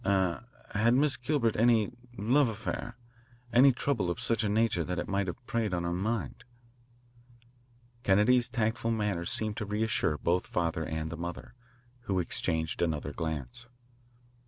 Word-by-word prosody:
Er 95 0 +1 0.3
r, 105 - 0
had 115 +2 +5
Miss 140 +1 +3
Gilbert 125 -3 0
any 115 -2 +4 0.3
love 125 +5 +3
affair, 115 +2 -5 0.6
any 135 +3 +7
trouble 120 -7 -1
of 85 - -2
such 115 -1 0
a 105 - +1
nature 105 -4 +2
that 90 +2 -3
it - - -2
might 100 0 0
have 120 +8 -6
preyed 110 -6 -1
on 85 - -2
her 85 0 -1
mind?" 105 +5 -2 1.6
Kennedy's 120 +5 +4
tactful 115 0 -1
manner 105 -6 -1
seemed 110 +3 0
to 105 - -2
reassure 105 -6 0
both 90 +4 +1
the - - -18
father 80 -2 -1
and 80 0 -3
the 85 - -5
mother, 85 +1 -6 0.5
who 95 - 0
exchanged 80 -2 -1
another 75 -4 -1
glance. 80 - -4
105 Hz, 160 wpm, -30 LUFS, 85-115 Hz, 1.6 s, any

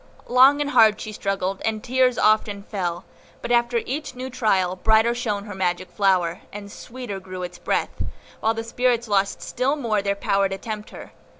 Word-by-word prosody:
Long 265 +4 +6
and 290 0 -1
hard 215 -4 +5
she 215 - -6
struggled, 195 -2 -2
and 220 -1 -1
tears 255 -1 +2
often 210 -2 +2
fell; 180 -4 -4 0.3
but 240 - -5
after 240 0 +3
each 285 0 -4
new 260 +1 -6
trial, 195 -7 +1
brighter 220 +4 +3
shone 215 -4 -2
her 205 -1 -8
magic 185 -1 -2
flower, 185 -4 +1
and 200 0 -8
sweeter 240 -5 -7
grew 185 -1 -7
its 180 0 -7
breath, - - -2 0.4
while 225 +1 +1
the 225 - -3
spirits 240 0 0
lost 200 -1 0
still 255 +4 0
more 230 -8 0
their 200 0 0
power 195 0 +1
to 195 - -4
tempt 215 +1 -6
her. - - -11
215 Hz, 185 wpm, -23 LUFS, 195-240 Hz, 0.4 s, Long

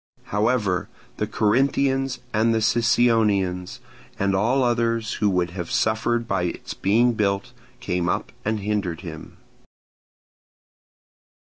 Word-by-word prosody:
However, 105 -3 +1 0.3
the - - -1
Corinthians 135 +3 +1 0.2
and 115 +1 +2
Sicyonians, 110 -4 +2 0.4
and 100 -2 +1
all 120 +7 +2
others 115 -2 0
who 105 - +4
would 90 -2 0
have 90 -2 -5
suffered 115 +2 0
by 95 -4 0
its 85 - -5
being 120 +5 +2
built, 100 -3 -1 0.3
came 90 -1 -1
up - - -2
and 110 0 -1
hindered 100 -5 -2
him. 80 -4 -9
110 Hz, 110 wpm, -23 LUFS, 95-115 Hz, 0.4 s, who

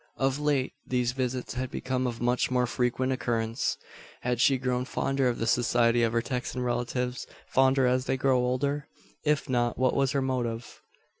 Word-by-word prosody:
Of 135 +1 +1
late 145 -3 +1
these 125 -1 0
visits 125 -1 -3
had 130 0 -3
become 130 0 -2
of 120 -2 -4
much 125 +1 +1
more 125 -1 +2
frequent 125 +2 0
occurrence. 115 0 -1 0.4
Had 125 -1 0
she 135 0 +5
grown 125 -1 -1
fonder 135 0 0
of 120 - 0
the 115 - -1
society 120 0 +3
of 115 -1 +2
her 115 -1 +1
Texan 125 0 -3
relatives 125 +1 -2 0.2
fonder 130 0 +4
as 125 +1 +2
they 135 - 0
grew 130 0 +2
older? 140 +4 -1 0.4
If 150 -1 +1
not, 120 -2 0
what 130 0 +2
was 135 0 +2
her 140 - +1
motive? 120 -3 -3
125 Hz, 175 wpm, -28 LUFS, 120-130 Hz, 0.4 s, she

